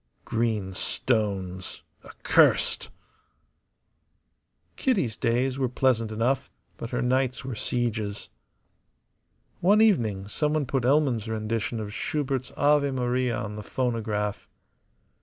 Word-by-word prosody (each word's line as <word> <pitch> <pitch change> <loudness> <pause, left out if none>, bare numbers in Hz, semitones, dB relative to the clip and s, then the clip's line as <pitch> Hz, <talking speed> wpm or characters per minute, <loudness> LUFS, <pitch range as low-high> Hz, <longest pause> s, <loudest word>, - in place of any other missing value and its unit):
Green 110 -5 -1
stones, 95 -5 -2 0.2
accursed. - - +2 1.9
Kitty's 185 - +1
days 125 +4 0
were 130 -2 +1
pleasant 120 -3 +1
enough, 125 +5 0 0.3
but 115 - -6
her 125 - -1
nights 130 0 0
were 130 - -4
sieges. 110 -3 -2 1.3
One 200 +4 +4
evening 115 - +2
someone 150 +6 0
put 130 -1 -1
Elman's 130 -5 +2
rendition 110 +1 -2
of 105 -1 -5
Schubert's 135 -1 -2
"Ave 145 0 +4
Maria" 125 -2 0
on 105 -3 -5
the - - -5
phonograph. 105 -3 -2
120 Hz, 100 wpm, -26 LUFS, 110-135 Hz, 1.9 s, One